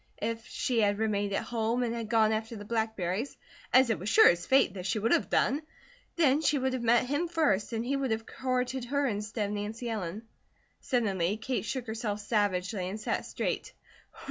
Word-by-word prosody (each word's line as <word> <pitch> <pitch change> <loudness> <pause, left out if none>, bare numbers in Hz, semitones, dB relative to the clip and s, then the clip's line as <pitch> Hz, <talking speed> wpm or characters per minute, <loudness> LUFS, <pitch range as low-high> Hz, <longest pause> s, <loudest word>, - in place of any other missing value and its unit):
If 230 0 -3
she 240 -3 0
had 205 -1 +2
remained 205 -2 0
at 195 - -1
home 235 +1 -1
and 235 -1 -1
had 230 -2 -4
gone 220 -1 +4
after 220 +1 -2
the 205 -1 -8
blackberries, 220 0 -2 0.3
as 260 -2 +5
it 225 - -1
was 195 - -3
sure 220 - +7
as 175 0 0
fate 265 -8 +4
that 185 -1 -5
she 225 - 0
would 220 +2 0
have - - +2
done, 280 +4 +2 0.5
then 300 -3 +3
she 300 -1 +2
would 260 -1 0
have 255 - -2
met 235 +1 +4
him 290 +7 -1
first, 310 - +1
and 230 0 -2
he 275 +3 0
would 275 -1 -1
have 220 0 -1
courted 255 -1 -2
her 285 +3 0
instead 210 -2 -2
of - - -4
Nancy 220 +3 -4
Ellen. 205 0 -4 0.6
Suddenly 205 -6 0
Kate 235 +1 -2
shook 255 +2 -3
herself 220 -2 -3
savagely 200 -3 0
and 205 +3 -5
sat - - -2
straight. - - -3
225 Hz, 200 wpm, -29 LUFS, 205-250 Hz, 0.6 s, sure